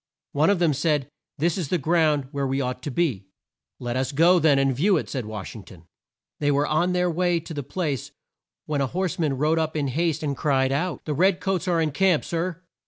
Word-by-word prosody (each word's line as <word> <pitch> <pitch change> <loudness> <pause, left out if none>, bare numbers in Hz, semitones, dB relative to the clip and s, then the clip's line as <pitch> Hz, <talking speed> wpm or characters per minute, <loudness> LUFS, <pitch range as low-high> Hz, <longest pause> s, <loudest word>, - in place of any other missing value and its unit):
One 150 +5 +2
of 200 - +3
them 170 -3 +2
said, 145 -1 0 0.3
"There 155 - -1
is 170 -1 0
the 180 - +1
ground 155 -3 +2
where 140 -2 -2
we 135 +1 -1
ought 125 -1 -3
to 145 - -4
be." 130 - -1 0.5
"Let 120 -1 -4
us 130 0 -1
go 170 +5 +5
then 155 -4 +4
and 135 -1 +2
view 185 +7 +3
it," - - -3
said 125 -6 -4
Wash 105 -1 -7
ing 110 - -8
ton. 85 -4 -15 0.6
They 145 - +1
were 145 0 +2
on 170 +5 +1
their 180 0 +1
way 175 0 +1
to 165 - -8
the 145 - -3
place, 145 - -3 0.6
when 145 -2 -1
a 135 - +1
horse 180 +4 -2
man 145 -5 0
rode 155 +4 +2
up 160 0 -2
in 140 -2 -1
haste 160 +4 -1
and 140 -2 -1
cried 135 -1 +1
out, 170 +6 -2
"The 150 - -1
red 185 +5 +3
coats 190 -2 -1
are 175 -2 +2
in 155 -2 +1
camp, 180 +1 +2
Sir!" 170 +1 -3
155 Hz, 235 wpm, -24 LUFS, 135-175 Hz, 0.6 s, go